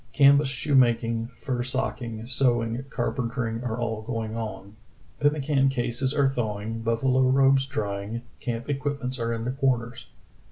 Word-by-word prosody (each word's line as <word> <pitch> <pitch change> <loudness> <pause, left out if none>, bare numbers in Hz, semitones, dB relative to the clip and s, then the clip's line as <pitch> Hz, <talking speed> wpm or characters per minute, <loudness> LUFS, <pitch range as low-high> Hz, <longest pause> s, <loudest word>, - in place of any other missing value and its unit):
Canvas 140 0 +6
shoemaking, 120 -4 +2
fur 125 0 -2
socking, 120 -3 -3
sewing, 120 -1 +1
carpentering 115 -3 -2
are 115 -2 -2
all 115 -2 -2
going 110 -1 -4
on. 105 -3 -6 0.4
Pem 145 0 +4
mican 135 -2 +2
cases 130 0 0
are 140 -2 +3
thawing, 115 -3 -2
buffalo 130 +3 +2
robes 135 0 +4
drying, 105 -3 -3 0.2
camp 120 -1 -4
equipments 140 -3 -2
are 115 0 -1
in 115 0 -3
the 125 - 0
corners." 125 -3 -1
120 Hz, 135 wpm, -26 LUFS, 115-135 Hz, 0.4 s, Canvas